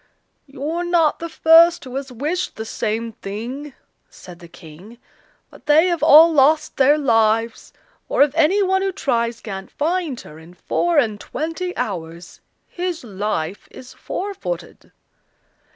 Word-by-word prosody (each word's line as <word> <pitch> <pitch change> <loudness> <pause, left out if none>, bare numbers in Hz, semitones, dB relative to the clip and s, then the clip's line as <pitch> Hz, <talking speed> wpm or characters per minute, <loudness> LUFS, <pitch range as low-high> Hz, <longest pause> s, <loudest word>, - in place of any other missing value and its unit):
"You're 295 +6 -4
not 340 -3 +1
the 335 - -6
first 330 +2 +5
who 255 -2 -9
has 270 -1 -5
wished 305 +9 -3
the 220 - -6
same 225 +1 -3
thing," 245 +8 -7 0.3
said 175 -2 -14
the 170 - -13
King, 175 +7 -14 0.5
"but - - -18
they 305 +3 +5
have 345 -2 -2
all 320 +3 +7
lost 305 +2 +2
their 280 +3 +4
lives; 225 -4 +1 0.4
for - - +4
if 290 - 0
any 335 +6 +3
one 380 0 +1
who 390 0 -1
tries 235 -9 -2
can't 195 -4 -7
find 325 -3 -2
her 150 +1 -13
in 165 +2 -16
four 345 - -1
and 220 -7 +1
twenty 330 +5 -5
hours 170 -3 -6 0.3
his 355 -3 -5
life 200 -4 -4
is 255 0 -13
forfeited." 400 +5 -6
275 Hz, 145 wpm, -20 LUFS, 220-330 Hz, 0.5 s, all